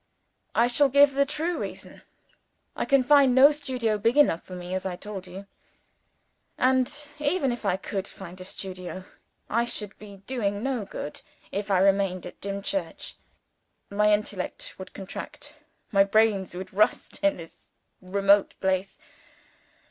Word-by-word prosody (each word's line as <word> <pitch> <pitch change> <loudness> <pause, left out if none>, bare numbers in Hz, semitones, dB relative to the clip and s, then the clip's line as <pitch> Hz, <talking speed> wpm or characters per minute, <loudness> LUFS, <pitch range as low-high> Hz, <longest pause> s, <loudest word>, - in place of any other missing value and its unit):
"I 235 - +5
shall 275 +4 +3
give 280 +1 +6
the 280 +1 +2
true 325 +4 -1
reason. - - -7 0.7
I - - -1
can 275 -2 +4
find 275 -2 +5
no 275 +3 +8
studio 260 -6 -2
here 215 - +1
big 230 +6 +2
enough 270 - +5
for 185 - -10
me 180 0 -6
as 185 0 -1
I 190 - -2
have - - -32
told 200 -3 -7
you. 190 +2 -9 1.1
And, 260 0 +3 0.3
even 290 -2 +1
if 240 -2 -5
I 185 -2 +2
could 195 0 -4
find 185 -1 -10
a - - -5
studio, 185 0 -6 0.4
I 235 +2 +1
should 210 -4 -5
be 205 -2 -11
doing 210 -5 -2
no 260 -6 -1
good, 150 - -7 0.3
if 205 +1 -3
I 195 - +4
remained 195 -1 +2
at 180 - -10
Dimchurch. 200 +9 -3 0.8
My 210 +1 +3
intellect 205 -2 -2
would 190 - -8
contract, 195 -2 -8 0.4
my 195 -2 +6
brains 200 -3 +2
would 185 +1 -7
rust, 215 +4 +1
in 295 -1 +2
this 165 -1 -13 0.3
remote 200 +2 +3
place. 190 0 0
205 Hz, 155 wpm, -26 LUFS, 190-255 Hz, 1.1 s, no